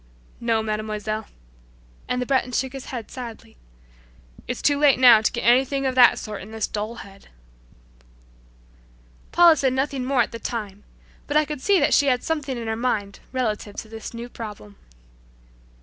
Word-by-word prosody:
"No, 225 -2 0
Mademoiselle," 215 0 -3 0.8
and 250 - -1
the 250 - -1
Breton 255 -1 0
shook 265 +1 -1
his 270 -1 -7
head 235 -4 -7
sadly, 235 - -9 0.9
"It's 245 - -4
too 285 -1 +3
late 290 -2 +5
now 245 -4 +8
to 220 - +1
get 235 - -4
anything 265 +3 +3
of 260 - +1
that 250 -1 +6
sort 210 -2 -6
in 205 - -10
this 220 -1 -2
dull 215 +2 -4
head." 195 0 -16 2.0
Paula 345 -2 +7
said 265 -3 +1
nothing 265 0 -1
more 255 -1 +2
at - - -7
the 230 - -7
time, 210 -4 -5 0.4
but 295 - +1
I 305 - +4
could 295 -2 -6
see 395 +5 +3
that 290 0 +2
she 285 - +4
had 250 -2 +1
something 290 -5 -2
in 235 - -5
her 220 0 -2
mind 220 -4 -2
relative 215 -5 -2
to 220 - -7
this 225 0 -8
new 235 +1 -7
problem. 210 -3 -9
240 Hz, 175 wpm, -23 LUFS, 220-265 Hz, 2.0 s, now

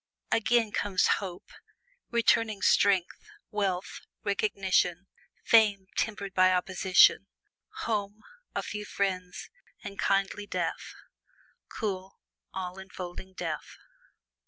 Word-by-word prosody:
Again 225 -1 +2
comes 200 -3 +1 0.2
hope 180 -3 -8 0.6
returning 230 -3 +2
strength, 190 -3 +3 0.3
wealth, 195 -3 -2 0.2
recognition, 190 -3 +1 0.4
fame 210 -4 +4
tempered 200 -3 -2
by 185 0 +5
opposition, 185 0 +4 0.6
home, 210 -1 -2 0.3
a - - -1
few 210 0 -5
friends, 185 -3 -3 0.3
and 200 -1 -8
kindly 195 +1 0
death - - -3 0.7
cool, 195 -3 -4 0.3
all 185 0 -5
enfolding 185 0 -8
death. 165 -4 -5
195 Hz, 90 wpm, -29 LUFS, 185-210 Hz, 0.7 s, by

